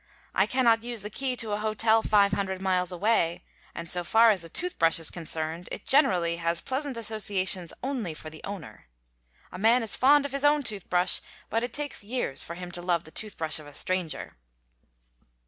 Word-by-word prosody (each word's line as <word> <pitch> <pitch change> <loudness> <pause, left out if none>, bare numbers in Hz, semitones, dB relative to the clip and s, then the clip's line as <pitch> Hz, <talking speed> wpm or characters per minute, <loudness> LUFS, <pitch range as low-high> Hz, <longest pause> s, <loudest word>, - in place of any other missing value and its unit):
I - - +2
cannot 235 -3 +3
use 235 -3 -4
the 210 - -6
key 260 +3 -2
to 225 -3 -1
a 205 - -1
hotel 220 +1 +3
500 200 -3 +1
miles 185 -1 +1
away, 180 -2 0 0.3
and 170 - -6
so 175 +2 +2
far 225 +5 +5
as 190 -5 -1
a 165 - -9
tooth 360 - -2
brush 165 +1 +5
is 165 - -2
concerned, 165 0 -3
it - - -6
generally 180 - +3
has 170 0 -1
pleasant 270 -1 -3
associations 195 -5 +1
only 245 - -3
for 155 0 -7
the 155 - -12
owner. 195 - -9 0.6
A - - -8
man 230 +4 +4
is 220 - +1
fond 285 +2 +5
of 285 - -4
his 275 +1 -3
own 290 0 +4
toothbrush, 195 -5 0 0.3
but 225 - +1
it 245 0 -3
takes 290 -5 -3
years 225 - -1
for 170 - -7
him 180 0 -8
to 175 - -7
love 175 -1 0
the 160 - -13
tooth 215 +2 -4
brush 160 -1 -1
of 150 - -12
a 145 - -12
stranger. 185 - -2
200 Hz, 200 wpm, -27 LUFS, 170-230 Hz, 0.6 s, far